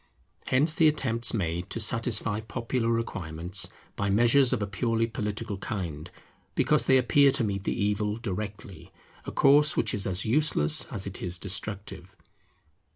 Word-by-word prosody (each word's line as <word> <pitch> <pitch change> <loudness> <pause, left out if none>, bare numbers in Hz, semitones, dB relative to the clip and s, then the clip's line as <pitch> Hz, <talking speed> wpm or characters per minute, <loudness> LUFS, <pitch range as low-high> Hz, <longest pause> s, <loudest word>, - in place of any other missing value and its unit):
Hence 145 +5 +3
the 165 -2 +4
attempts 120 -6 +1
made 85 -4 -3
to - - -3
satisfy 115 -1 +1
popular 115 +2 -3
requirements 95 -5 -2 0.3
by 100 - -2
measures 120 +6 +4
of 130 - 0
a 100 - -1
purely 115 +3 -1
political 105 -2 -5
kind, 85 -7 -5 0.5
because - - +2
they 130 - +6
appear 140 +3 +4
to - - +1
meet 100 -2 -3
the - - -2
evil 105 +1 -1
directly; 100 -4 -7 0.3
a - - -5
course 145 +2 +4
which - - +1
is 100 -2 0
as 95 0 -2
useless 120 - +3
as 95 - -6
it 100 -1 -6
is 90 -1 -3
destructive. 100 +2 -4
105 Hz, 155 wpm, -27 LUFS, 100-120 Hz, 0.5 s, they